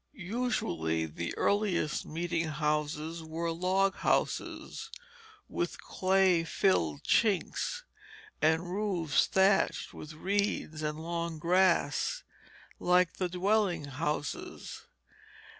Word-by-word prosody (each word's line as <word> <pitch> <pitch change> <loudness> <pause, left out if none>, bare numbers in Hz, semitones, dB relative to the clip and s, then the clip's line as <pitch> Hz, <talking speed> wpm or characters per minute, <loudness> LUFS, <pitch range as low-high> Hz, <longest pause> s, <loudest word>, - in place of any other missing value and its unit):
Usually 175 - -1
the 80 +2 -5
earliest 200 -7 +1
meeting 165 +1 -1
houses 150 +2 -1
were 165 +1 -3
log 185 +3 +2
houses, 455 +1 -1 0.6
with 175 - -3
clay 185 -2 +2
filled 80 - +1
chinks, 230 - +1 0.6
and 160 +2 +3
roofs 185 -7 +1
thatched 195 +1 +2
with 155 +1 -9
reeds 190 -2 -1
and 150 0 -2
long 170 0 -3
grass, 185 - +2 0.6
like 180 -1 +3
the 185 -2 -1
dwelling 190 -1 +1
houses. 145 +1 -4
170 Hz, 90 wpm, -31 LUFS, 155-190 Hz, 0.6 s, and